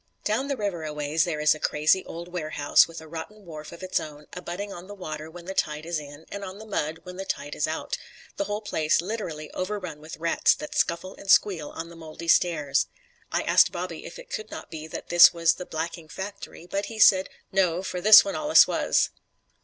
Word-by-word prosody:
Down 225 +6 0
the 280 -2 -2
river 200 -7 -2
aways 150 +1 0
there 160 -4 -2
is 150 0 +5
a 155 - -8
crazy, 155 +6 +2
old 170 +1 -7
warehouse 155 -4 +3
with 165 -1 -9
a 160 - -12
rotten 170 +6 -8
wharf 155 -2 -9
of 170 +2 -11
its 185 - 0
own, 150 -1 -9
abutting 180 +3 -5
on 175 +2 -10
the 205 - -9
water 155 -4 -6
when 170 +1 -11
the 190 - -5
tide 150 -4 -1
is 170 -1 -2
in, 145 +1 -11
and 200 0 -5
on 190 0 -7
the 220 - -10
mud 165 -6 -3
when 180 0 -9
the 195 - -4
tide 145 -5 -4
is 150 - 0
out 160 +1 -3 0.4
the 300 - -1
whole 210 -3 -3
place 155 -7 +1
literally 170 -5 -4
overrun 185 -5 -4
with 155 +1 -9
rats 165 +1 +3
that 150 - -8
scuffle 170 +3 0
and 195 - -11
squeal 180 -7 +4
on 165 - -7
the 170 - -12
moldy 165 0 -9
stairs. 150 -5 +3 0.4
I - - 0
asked - - +5
Bobby - - -5
if - - -9
it - - -13
could 440 -3 -5
not - - -9
be 155 -1 -7
that - - -8
this 175 +1 +8
was 165 0 +4
the 180 - -8
blacking 165 +1 -5
factory; 190 0 -8
but 200 +3 -3
he 225 - -8
said, 190 -3 +6 0.2
No, 185 -2 +2
for 180 -2 -4
this 215 +6 +9
one 295 - -3
allus 305 0 +6
wuz. - - +1
170 Hz, 225 wpm, -26 LUFS, 155-195 Hz, 0.4 s, this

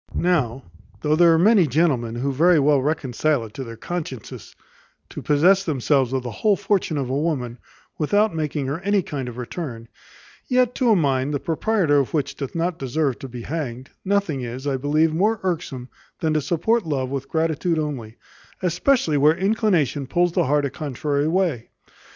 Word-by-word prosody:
Now, 135 -8 0 0.4
though 150 0 +2
there 170 +1 +6
are 165 - +4
many 195 0 +5
gentlemen 130 -6 +1
who 135 +3 -2
very 170 +5 +4
well 145 -1 +3
reconcile 145 -2 0
it 105 - -12
to 135 - -5
their 115 -2 -9
consciences 155 -9 -6 0.5
to - - -7
possess 180 +7 +4
themselves 135 -5 +1
of 130 -1 -1
the 120 - -5
whole 205 - +2
fortune 195 -5 0
of 135 -3 -2
a - - 0
woman, 140 -6 -2 0.4
without 205 +7 +2
making 150 -3 -2
her 140 +5 -3
any 200 +1 +1
kind 135 -6 -5
of 120 - -10
return; 120 -3 -6 0.6
yet 250 -1 +2
to 250 -2 +1
a 220 - +6
mind, 140 -3 +1
the - - -1
proprietor 165 -2 +1
of 140 +3 -1
which 145 -4 -1
doth 140 +1 -6
not 170 +1 -1
deserved 135 0 -1
to 135 - -7
be 120 -1 -8
hanged, 130 -4 -5
nothing 195 -8 0
is, 125 +3 -6
I 140 -2 0
believe, 150 +4 +1
more 210 +6 +1
irksome 155 -8 -3 0.3
than 160 -1 0
to 155 - +1
support 190 - +1
love 135 -6 -2
with 135 -1 -4
gratitude 160 +1 0
only; 130 -8 -4 0.5
especially 180 - +2
where 150 +3 +4
inclination 185 - +1
pulls 175 +5 +1
the - - +1
heart 145 +2 +2
a 140 - -3
contrary 145 +1 -2
way. 165 -9 0
150 Hz, 180 wpm, -22 LUFS, 130-175 Hz, 0.6 s, there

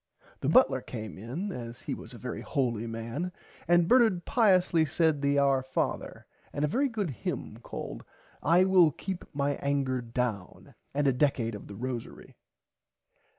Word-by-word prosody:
The - - -1
butler - - +5
came 110 -3 -7
in 145 - -4
as 120 -6 -7
he - - -4
was - - -8
a - - -9
very - - -5
holy 120 -4 -1
man 115 +10 -4 0.4
and 175 0 +4
Bernard 225 -8 +4
piously 185 -8 +4
said 155 -1 +1
the 140 0 +2
Our 140 -1 +3
Father 130 0 -3 0.3
and 145 - 0
a - - +1
very 270 - +1
good 210 - -2
hymm 120 - -5
called - - -7 0.4
I 170 +4 +5
will 185 -4 +5
keep 185 +5 -5
my 145 -1 -1
anger 135 -3 0
down 115 -5 -4 0.2
and 145 0 +1
a 135 - +4
Decad 125 -4 +1
of 105 - -8
the 100 - -9
Rosary. 125 +1 -6
140 Hz, 160 wpm, -29 LUFS, 120-175 Hz, 0.4 s, butler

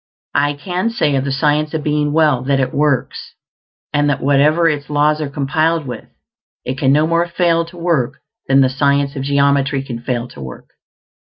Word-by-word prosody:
I 145 0 +1
can 180 +8 -3
say 225 -10 0
of 135 0 -1
the 140 - -2
Science 150 +3 0
of 155 - -2
Being 150 -1 0
Well 150 -5 +2
that 140 0 +1
it 130 -1 -1
works; 145 -3 -1 0.6
and 145 0 +2
that 140 -2 0
wherever 145 +5 +3
its 145 -2 -2
laws 150 +1 +1
are 150 - -3
complied 155 +3 0
with, 125 - -7 0.6
it 130 +1 -4
can 135 -3 +2
no 150 +2 +3
more 170 +1 +1
fail 170 -1 +1
to 170 +2 -14
work 155 -6 0 0.3
than 135 0 +4
the 130 - +4
science 140 +1 0
of 135 - -4
geometry 140 0 +1
can 120 -4 -6
fail 120 -1 -3
to 70 - -12
work. 65 -1 -10
145 Hz, 190 wpm, -17 LUFS, 135-155 Hz, 0.6 s, than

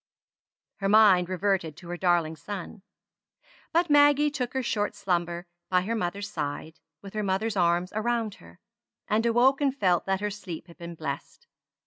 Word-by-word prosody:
Her 195 -1 -1
mind 200 -4 +6
reverted 185 -4 -1
to 175 0 -12
her 175 - -3
darling 175 -3 +1
son; 190 +5 -7 0.9
but 340 +1 +2
Maggie 290 0 +5
took 255 -4 -3
her 265 - 0
short 210 -3 -1
slumber 175 -1 -2 0.2
by 180 -1 +3
her 210 +5 -2
mother's 200 -1 -2
side, 155 -1 -5 0.2
with 195 - -10
her 215 - -1
mother's 205 +3 -1
arms 175 0 +1
around 225 0 -1
her; 85 0 -16 0.5
and 220 +2 +1
awoke 255 +4 +4
and 275 -1 +1
felt 180 -6 +2
that 190 0 +1
her 210 0 -1
sleep 185 -5 -7
had 170 -1 -16
been 170 0 -7
blessed. 140 -3 -6
195 Hz, 165 wpm, -27 LUFS, 175-225 Hz, 0.9 s, mind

